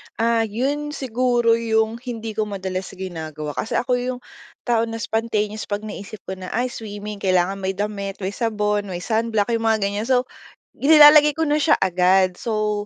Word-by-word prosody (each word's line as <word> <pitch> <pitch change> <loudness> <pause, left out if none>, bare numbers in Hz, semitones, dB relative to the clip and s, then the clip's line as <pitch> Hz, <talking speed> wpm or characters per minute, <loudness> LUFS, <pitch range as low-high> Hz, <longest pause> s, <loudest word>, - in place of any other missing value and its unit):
Ah, 230 -1 +1
'yon 290 +7 -2
siguro 240 -2 +1
'yong 220 0 0
hindi 230 -3 -6
ko 215 0 -2
madalas 190 -2 -4
ginagawa, 160 -5 -6
kasi 215 - -4
ako 250 - -1
'yong 250 0 -4 0.4
tao 230 -2 +1
na 225 - -5
spontaneous 215 -1 -2
'pag 205 +1 -3
naisip 205 -1 -8
ko - - -7
na, 185 - -7
"Ay, 245 +1 0
swimming, 210 -1 -7
kailangan 185 +1 +1
may 190 0 -2
damit, 200 -1 -3
may 190 - -1
sabon, 210 -3 -1
may 180 -1 -5
sunblock," 220 -1 0
'yong 225 -1 0
mga 220 -1 +3
ganyan. 205 +3 -2
So, 255 -1 +3 0.5
nilalagay 300 0 +7
ko 320 - 0
na 300 -1 +2
siya 300 +1 +4
agad. 185 0 +3
So, 215 -2 -2
220 Hz, 175 wpm, -22 LUFS, 200-235 Hz, 0.5 s, nilalagay